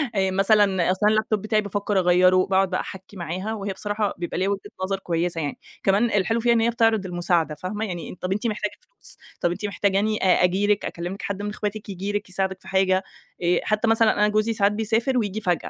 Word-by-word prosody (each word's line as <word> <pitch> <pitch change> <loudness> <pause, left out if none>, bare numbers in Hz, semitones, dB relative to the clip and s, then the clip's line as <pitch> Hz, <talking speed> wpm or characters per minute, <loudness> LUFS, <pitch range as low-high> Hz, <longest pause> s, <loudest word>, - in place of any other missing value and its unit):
آآ 190 -1 +1
مثلًا 195 -2 +3
أصْل 185 - -2
أنا - - +6
اللاب 215 0 +1
توب 215 -2 +1
بتاعي 215 +1 +1
بافكّر 205 0 -1
أغيّره، 180 +1 +4
باقعُد 190 0 +2
بقى 185 - -1
أحكّي 190 +1 -10
معاها 185 +5 -4
وهي 200 -2 -4
بصراحة 205 +1 -2
بيبقى 175 -1 -4
ليها 190 +2 +1
وِجهة 200 +1 -4
نظر 195 +1 -1
كويسة 170 -2 -1
يعني، 145 -2 -4 0.2
كمان 200 +4 +3
الحلو 210 +2 +1
فيها 235 +1 +3
إن 230 - +2
هي 230 - +3
بتعرِض 225 -3 +2
المساعدة، 175 -3 0
فاهمة، 205 +7 -4
يعني 175 -5 -6
"طَب 185 - -3
أنتِ 210 +4 0 0.2
محتاجة 205 - -1 0.2
فلوس؟ - - -11 0.2
طَب 175 - +2
أنتِ 180 - -4
محتاجاني 200 +2 +1
أ 185 -1 +4
أجي 190 +3 +2
لِك، 210 0 +1
أكلّم 175 +2 -4
لِك، 200 - -9
حد 200 0 -4
من 205 - -3
إخواتِك 210 0 -5
ييجي 195 +1 -4
لِك 205 -2 -3
يساعدِك 190 0 -2
في - - -15
حاجة؟" 190 0 +2 0.4
آآ 175 +1 +3
حتى 215 +1 0
مثلًا 225 0 +4
أنا 210 0 +2
جوزي 215 +2 +1
ساعات 200 -1 +2
بيسافر 225 +4 0
وييجي 215 -2 -1
فجأة 180 -4 +2
200 Hz, 225 wpm, -24 LUFS, 185-215 Hz, 0.4 s, أنا